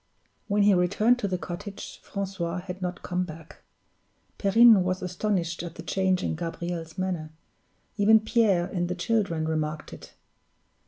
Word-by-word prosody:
When 205 -1 +2
he 205 0 +6
returned 215 +7 +3
to 205 - -1
the 185 -1 -1
cottage, 195 +3 -7
Francois 190 -3 -4
had 185 0 -8
not 180 0 -4
come 180 0 -1
back. 160 -2 -11 0.8
Perrine 220 +1 +6
was 185 +1 -2
astonished 180 -2 -1
at 170 -1 -7
the - - -8
change 190 -1 0
in - - -1
Gabriel's 165 0 -5
manner; 180 -4 -2 0.7
even 220 +2 +6
Pierre 215 -5 +2
and 175 -1 -2
the 180 - -2
children 180 -5 0
remarked 155 -1 -3
it. - - -12
185 Hz, 150 wpm, -27 LUFS, 170-200 Hz, 0.8 s, he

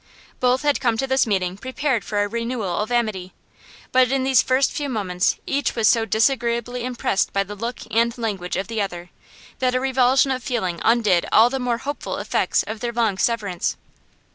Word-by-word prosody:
Both 255 +1 +2
had 290 -1 +2
come 235 -3 +1
to 270 - 0
this 265 -2 +2
meeting 190 -3 -1
prepared 260 -2 -1
for 205 -1 -1
a - - -1
renewal 230 -4 -3
of 215 +3 -2
amity, 215 -6 -1 0.6
but 255 -1 +4
in 270 -1 +1
these 265 -2 +4
first 260 +1 +2
few 290 -1 -3
moments 190 -6 0
each 280 +1 -1
was 225 -2 +2
so 230 -2 +4
disagreeably 235 +1 0
impressed 240 -5 -1
by 195 - +2
the 200 +1 -8
look 230 +4 -5
and 235 +2 +1
language 200 -6 -3
of 190 - -2
the 225 -1 -2
other 180 -3 -5 0.5
that 255 -1 +1
a - - +2
revulsion 265 +1 +3
of 255 -1 -2
feeling 220 - -2
undid 215 -7 +3
all 230 +2 +6
the 270 - -2
more 245 -2 0
hopeful 280 +4 -5
effects - - 0
of 220 0 -6
their 240 +1 -3
long 225 -5 0
severance. 205 -7 -1
235 Hz, 190 wpm, -22 LUFS, 205-255 Hz, 0.6 s, all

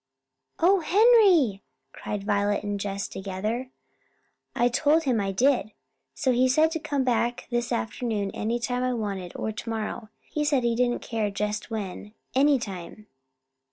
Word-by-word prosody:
"O 375 +4 +4
Henry!" 365 - +5 0.3
cried 205 -1 -5
Violet 205 0 0
and 205 -1 -3
Jess 200 0 -3
together. 210 +6 -4 0.9
"I 240 - +3
told 300 +6 +2
him 250 -7 +1
I 195 -1 -1
did, 240 +1 +2 0.4
so 265 - +1
he 250 +1 +3
said 310 +5 +3
to 325 - -2
come 290 -3 -1
back 240 -1 0
this 240 0 -1
afternoon 205 - -2
any 230 +3 -1
time 245 +1 -2
I 255 0 0
wanted, 200 -6 -4
or 220 - -2
tomorrow 220 0 -5
he 300 - -3
said 285 -4 +2
he 235 -1 +1
didn't 240 0 0
care 220 -3 -1
just 210 +2 -3
when 210 -1 -6 0.2
any 280 +2 +4
time." 200 -2 -7
235 Hz, 155 wpm, -26 LUFS, 205-265 Hz, 0.9 s, Henry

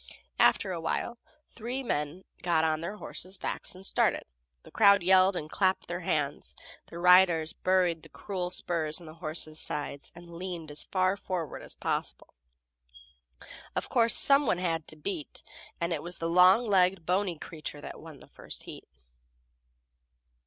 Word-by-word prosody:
After 185 +11 +4
a 170 -2 -4
while 235 +8 -2 0.3
three 250 +4 -5
men 150 - -3 0.2
got 170 -3 +2
on 155 -1 +1
their 190 +5 -5
horses' 185 -2 -2
backs 190 - -2
and 190 +1 -10
started. - - +1 0.4
The - - -15
crowd 200 -3 +5
yelled 185 +1 +5
and 155 -3 -4
clapped 190 +3 0
their 175 0 -4
hands; 150 -5 -2 0.3
the 170 - -10
riders 175 -2 +5
buried 180 -3 +1
the - - -15
cruel 185 -3 -4
spurs 165 -3 -2
in 175 - -13
the 155 - -10
horses' 155 -1 -2
sides, 145 -1 -5
and 170 0 -13
leaned 170 -3 -6
as 145 - -1
far 185 0 +1
forward 180 -5 -5
as - - -8
possible. - - -4 1.4
Of - - -3
course, 230 -2 +4
some 280 -1 +5
one 180 - +2
had 165 -3 -2
to - - -6
beat, 155 0 -5 0.4
and 170 0 -1
it - - -3
was 175 +1 -8
a 165 - -3
long 180 +7 +5
legged, 185 -4 +3
bony 185 -1 0
creature 155 -2 -8
that - - -9
won - - -12
the - - -15
first - - -7
heat. - - -11
175 Hz, 165 wpm, -29 LUFS, 160-190 Hz, 1.4 s, crowd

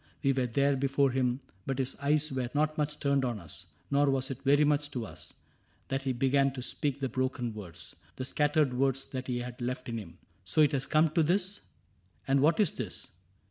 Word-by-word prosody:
We 135 -1 +4
were 130 -2 0
there 140 +4 +2
Before 140 0 +2
him, 125 0 0 0.3
but 135 - -1
his 130 -1 -1
eyes 150 +2 +1
were 130 -2 -2
not 155 +1 +2
much 150 0 -1
turned 140 -2 +2
On 120 -4 -1
us; 85 -5 -6 0.2
nor 140 0 +4
was 135 0 +1
it 130 - -6
very 145 +1 +4
much 145 0 +2
to 125 -5 -4
us - - -9 0.5
That 135 0 -1
he 135 -1 -1
began 135 +2 +2
to 130 -2 -5
speak 140 +1 -2
the 135 - 0
broken 130 -2 -2
words. 95 -6 -8 0.2
The 130 - -4
scattered 145 -1 +2
words, 135 +1 +1
that 130 -1 -6
he 125 -1 -1
had 125 +1 -6
left 125 +2 -3
in 115 -1 -2
him. 100 -6 -8
^' - - -23 0.3
So 95 - +2
it 150 - +5
has 135 -1 -1
come 155 0 +3
to 165 - +3
this? 185 +5 +1 0.7
And 135 +1 +4
what 155 +7 +3
is 205 -7 +4
this 110 -8 -4
135 Hz, 220 wpm, -30 LUFS, 125-145 Hz, 0.7 s, it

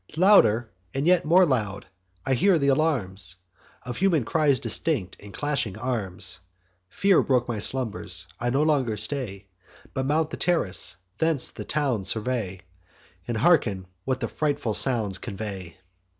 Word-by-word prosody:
Louder, 120 - +5 0.2
and 135 +2 -1
yet 175 -1 +3
more 180 +4 +5
loud, 105 - -2 0.4
I 135 - +1
hear 180 +8 +3
th' 145 - -2
alarms 105 - 0 0.5
Of 125 -1 -6
human 175 -7 +2
cries 150 -2 +2
distinct, 115 - 0
and 100 0 -12
clashing 140 -7 -2
arms. 100 -8 -3 0.5
Fear 195 - +3
broke 125 -2 +1
my 115 -3 -3
slumbers; 105 -8 -1
I 120 - -1
no 135 +4 +1
longer 135 -8 +1
stay, 105 -3 -3 0.5
But 130 -1 -2
mount 155 +2 +1
the - - -5
terrace, 165 - -1 0.2
thence 160 -5 +2
the - - -8
town 135 -9 -1
survey, 105 -1 -2 0.7
And 120 -2 -2
hearken 110 - +2 0.2
what 130 -1 -2
the 115 - -1
frightful 145 -7 -2
sounds 105 -7 +3
convey. 95 -5 -7
125 Hz, 145 wpm, -25 LUFS, 105-150 Hz, 0.7 s, Louder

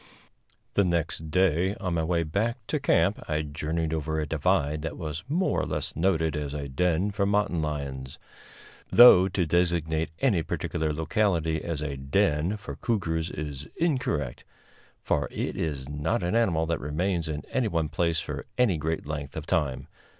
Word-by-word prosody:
The 100 - +4
next 80 -3 -1
day, 95 +2 +2
on 90 -3 -3
my 80 -1 +1
way 85 0 +1
back 110 - -2
to - - 0
camp, - - +2
I 75 0 0
journeyed 80 +2 -2
over 80 0 -1
a 75 - -1
divide 75 0 +1
that 80 - -5
was 80 +1 -5
more 180 +5 +1
or - - -2
less - - -3
noted 80 -2 +1
as 75 -1 -3
a 70 -1 -4
den 90 +7 +1
for 100 0 0
mountain 100 -5 +1
lions; 70 -4 -4 0.7
though 105 -6 +9
to 95 -2 0
designate 80 -2 +1
any 100 -6 +2
particular 80 0 -2
locality 80 -1 0
as 80 -3 -3
a 70 -2 -3
"den" 75 +6 +1
for 75 -9 -8
cougars 85 -7 -1
is 75 -3 -6
incorrect, 130 - -1 0.6
for - - +1
it - - -3
is 70 -5 -3
not 75 +4 -1
an 90 - 0
animal 85 -9 +2
that 85 -1 -1
remains 85 +4 -1
in 75 -2 -4
any 130 -3 +1
one 80 -5 0
place 85 +1 0
for - - -5
any 120 -9 +3
great 80 +1 -2
length 75 -1 -5
of 80 - -5
time. 75 -8 -1
80 Hz, 170 wpm, -27 LUFS, 75-90 Hz, 0.7 s, though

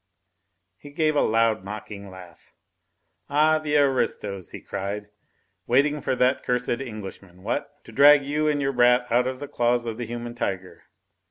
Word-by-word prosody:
He 145 - -12
gave 155 +1 0
a - - +3
loud, 115 -2 +2
mocking 100 0 -8
laugh. 90 -2 -15 0.7
"Ah, 155 +2 +3
the 150 -1 0
aristos!" 105 - 0
he - - -9
cried, 100 +1 -5 0.6
"waiting 145 +4 +2
for 130 - -1
that 125 +2 +2
cursed 125 0 -1
Englishman, 100 -6 -9
what? 115 - -2
to - - -13
drag 140 +3 +6
you 150 +2 0
and 150 -1 +1
your 135 0 0
brat 125 0 +4
out 125 +2 +3
of 130 0 -4
the 145 - -6
claws 120 -3 0
of 115 -1 -4
the 120 - -4
human 120 0 -6
tiger.... 95 -6 -5
120 Hz, 165 wpm, -24 LUFS, 105-140 Hz, 0.7 s, drag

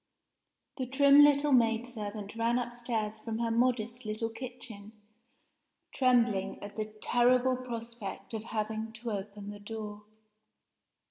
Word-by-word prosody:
THE 260 -2 -2
trim 280 +2 +7
little 290 0 +4
maid 230 -2 +4
servant 210 -3 -6
ran 230 +1 +1
upstairs 235 -3 -3
from 225 0 -4
her 230 0 0
modest 240 0 +1
little 215 +1 -2
kitchen, 225 -3 -9 1.0
trembling 240 -6 +2
at 205 - -8
the 215 - -2
terrible 250 +2 +3
prospect 235 -5 -6
of 220 0 -4
having 220 0 -3
to 230 +1 -5
open 205 0 -5
the 205 - -9
door. 210 0 -7
230 Hz, 125 wpm, -31 LUFS, 215-245 Hz, 1.0 s, trim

